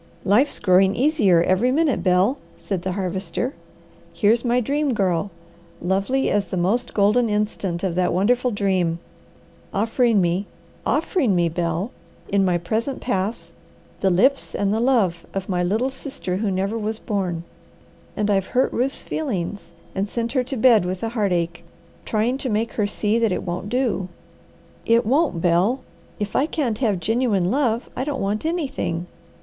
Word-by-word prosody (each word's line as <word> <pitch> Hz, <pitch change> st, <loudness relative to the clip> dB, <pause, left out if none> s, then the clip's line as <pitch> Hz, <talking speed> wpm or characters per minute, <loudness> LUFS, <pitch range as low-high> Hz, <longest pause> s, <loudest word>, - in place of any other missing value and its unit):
"Life's 240 Hz, +9 st, +3 dB
growing 190 Hz, 0 st, +4 dB
easier 240 Hz, -, +3 dB
every 185 Hz, +8 st, +2 dB
minute, 300 Hz, -1 st, +2 dB
Bel," 190 Hz, +9 st, +2 dB, 0.2 s
said 190 Hz, -4 st, -3 dB
the 185 Hz, 0 st, -2 dB
Harvester. 190 Hz, +5 st, -2 dB, 0.6 s
"Here's 225 Hz, +2 st, +2 dB
my 245 Hz, 0 st, +2 dB
Dream 280 Hz, +2 st, 0 dB
Girl, 190 Hz, -1 st, 0 dB, 0.5 s
lovely 195 Hz, +9 st, 0 dB
as 205 Hz, -2 st, +1 dB
the 185 Hz, -, -3 dB
most 220 Hz, +8 st, 0 dB
golden 220 Hz, +3 st, +3 dB
instant 205 Hz, -4 st, -1 dB
of 185 Hz, -3 st, 0 dB
that 180 Hz, +1 st, +1 dB
wonderful 245 Hz, +8 st, +2 dB
dream, 190 Hz, -6 st, 0 dB, 0.7 s
offering 225 Hz, +1 st, +2 dB
me 180 Hz, +2 st, 0 dB, 0.4 s
offering 260 Hz, -, +1 dB
me, 170 Hz, -1 st, +2 dB
Bel 170 Hz, +6 st, -2 dB, 0.4 s
in 200 Hz, -1 st, +2 dB
my 180 Hz, -2 st, +2 dB
present 220 Hz, +10 st, -2 dB
pass, 190 Hz, -6 st, -2 dB, 0.5 s
the 195 Hz, -, +2 dB
lips 255 Hz, +10 st, +2 dB
and 200 Hz, 0 st, +1 dB
the 220 Hz, -, 0 dB
love 225 Hz, -9 st, +2 dB
of 195 Hz, -1 st, -3 dB
my 180 Hz, -2 st, 0 dB
little 220 Hz, +9 st, 0 dB
sister 265 Hz, -9 st, -5 dB
who 210 Hz, +1 st, -1 dB
never 195 Hz, +4 st, -1 dB
was 220 Hz, +1 st, -2 dB
born. 185 Hz, -7 st, -2 dB, 0.7 s
And 210 Hz, 0 st, +1 dB
I've 195 Hz, -2 st, +1 dB
hurt 260 Hz, -, +3 dB
Ruth's 260 Hz, +3 st, 0 dB
feelings, 205 Hz, -, -3 dB, 0.2 s
and 200 Hz, +1 st, -2 dB
sent 235 Hz, +1 st, -2 dB
her 255 Hz, -1 st, +1 dB
to 265 Hz, +1 st, -4 dB
bed 230 Hz, -4 st, +5 dB
with 180 Hz, +2 st, -4 dB
a 225 Hz, -, 0 dB
heartache, 175 Hz, -7 st, -1 dB, 0.4 s
trying 235 Hz, +5 st, 0 dB
to 260 Hz, -, -3 dB
make 220 Hz, +1 st, -1 dB
her 210 Hz, -2 st, 0 dB
see 210 Hz, +2 st, 0 dB
that 225 Hz, -3 st, +2 dB
it -, -, -2 dB
won't 180 Hz, +3 st, -4 dB
do. 240 Hz, -6 st, 0 dB, 0.8 s
It 230 Hz, 0 st, +3 dB
won't, 270 Hz, -, +1 dB
Bel! 180 Hz, +9 st, +2 dB, 0.4 s
If 205 Hz, -1 st, -4 dB
I 285 Hz, -, +3 dB
can't 245 Hz, -10 st, -1 dB
have 210 Hz, -8 st, +1 dB
genuine 205 Hz, -2 st, +1 dB
love, 245 Hz, -4 st, +1 dB
I -, -, -2 dB
don't 280 Hz, -1 st, -3 dB
want 210 Hz, +8 st, -1 dB
anything. 260 Hz, -, -2 dB
205 Hz, 165 wpm, -22 LUFS, 185-245 Hz, 0.8 s, bed